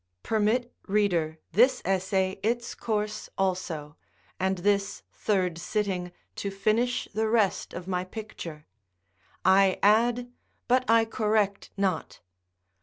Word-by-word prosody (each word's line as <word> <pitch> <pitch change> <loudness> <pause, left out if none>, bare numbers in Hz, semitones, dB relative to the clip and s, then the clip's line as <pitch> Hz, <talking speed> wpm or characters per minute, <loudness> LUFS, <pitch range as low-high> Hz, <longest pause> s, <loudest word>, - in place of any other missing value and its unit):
Permit, 225 +3 +1
reader, 180 -6 +1
this 250 - +4
essay 190 0 0
its 235 +3 -1
course 215 -1 -3
also, 175 -5 -2 0.4
and 190 +1 +1
this 200 +2 0
third 185 -5 0
sitting 185 -1 -2 0.3
to 200 - -2
finish 215 +5 0
the 220 +1 0
rest 220 -4 +1
of 175 +1 -7
my 180 -1 -1
picture: 185 -6 -8 0.8
I 190 0 +5
add, 240 +4 +3 0.4
but 255 0 +2
I 230 0 +5
correct 210 -2 0
not. 195 -2 -1
200 Hz, 110 wpm, -27 LUFS, 185-220 Hz, 0.8 s, I